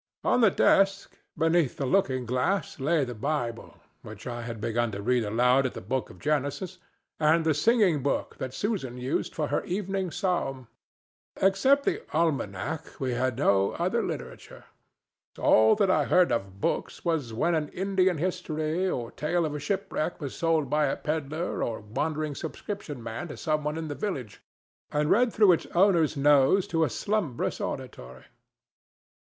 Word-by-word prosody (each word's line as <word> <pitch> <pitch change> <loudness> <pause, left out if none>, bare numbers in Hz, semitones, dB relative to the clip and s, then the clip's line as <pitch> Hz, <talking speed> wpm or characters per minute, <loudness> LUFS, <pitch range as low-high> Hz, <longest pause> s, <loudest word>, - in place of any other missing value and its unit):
On 250 - +3
the 220 - +7
desk, 195 +1 +2 0.2
beneath 165 -3 +2
the 140 - -2
looking 130 -6 +1
glass, 130 - -1
lay 150 +1 +2
the 125 - -6
Bible, 120 -1 -3 0.2
which 105 0 -11
I 120 -1 -4
had 115 -1 -6
begun 115 +1 -1
to 100 - -4
read 125 +1 +2
aloud 125 +5 +3
at - - -9
the - - -5
book 130 +6 -3
of - - -13
Genesis, 145 +3 -2 0.4
and 160 +1 +3
the 160 - +3
singing 185 - +3
book 140 - -1
that 130 - -4
Susan 155 - -3
used 125 +3 -2
for 150 -2 -1
her 145 - 0
evening 195 -1 -2
psalm. 140 - -2 0.7
Except 260 +9 +3
the - - 0
almanac, 155 - -2
we 130 -3 -1
had 125 0 -1
no 100 -7 +2
other - - 0
literature. - - -7 0.7
All 110 0 +5
that 200 -3 +2
I - - +2
heard 180 -1 +4
of 95 -4 -2
books - - -2
was 160 -8 0
when 145 +10 0
an 155 -2 0
Indian 190 -2 +1
history 170 0 -1
or 120 -7 -3
tale 170 +3 0
of 150 -1 -4
shipwreck 185 -1 -2
was 140 -5 -5
sold 165 -3 +1
by 150 +2 +2
a - - 0
pedler 155 +2 -3
or 115 - -2
wandering 150 +8 -3
subscription 150 - -6
man 115 +9 -5
to 150 - -8
some 155 -1 -1
one 150 +1 -2
in 165 -1 -4
the 145 - -4
village, 140 - -5 0.5
and 150 0 +1
read 245 +2 +4
through 210 -3 +5
its 170 - +1
owner's 170 -5 +3
nose 145 +6 +4
to 165 -1 +2
a 155 - +1
slumbrous 195 - -2
auditory. 65 +1 -6
150 Hz, 165 wpm, -27 LUFS, 125-175 Hz, 0.7 s, the